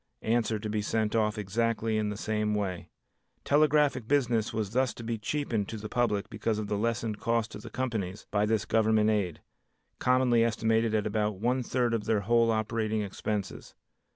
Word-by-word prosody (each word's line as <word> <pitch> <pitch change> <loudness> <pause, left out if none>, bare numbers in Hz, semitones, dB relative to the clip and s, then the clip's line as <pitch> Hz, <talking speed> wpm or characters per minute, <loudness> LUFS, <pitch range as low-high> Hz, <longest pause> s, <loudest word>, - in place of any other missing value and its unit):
Answer 115 -1 +1
to 105 +1 -5
be 105 0 -1
sent 110 +1 -1
off 110 -1 +1
exactly 115 +2 0
in 105 -1 -1
the 105 - -4
same 105 0 -1
way. 90 -5 -3 0.5
Telegraphic 145 -4 +3
business 120 -6 +1
was 110 -3 -2
thus 130 +1 +1
to 120 - -8
be 115 -1 -3
cheapened 115 -4 -2
to 110 - -5
the 105 0 -7
public 110 -4 0
because 110 -2 -2
of 110 - -2
the 105 - -2
lessened 115 -1 -1
cost 115 -1 0
to - - -8
the - - -9
companies 110 -7 -3
by 105 0 +2
this 110 -1 +1
Government 110 -1 +3
aid, 95 -6 -1 0.6
commonly 125 -2 +3
estimated 110 -1 +1
at 105 - +1
about 105 -1 0
one 125 +4 +1
third 120 -1 0
of 110 -2 -1
their 110 -2 +1
whole 115 +3 +3
operating 110 -1 0
expenses. 100 0 -4
110 Hz, 180 wpm, -29 LUFS, 105-115 Hz, 0.6 s, Telegraphic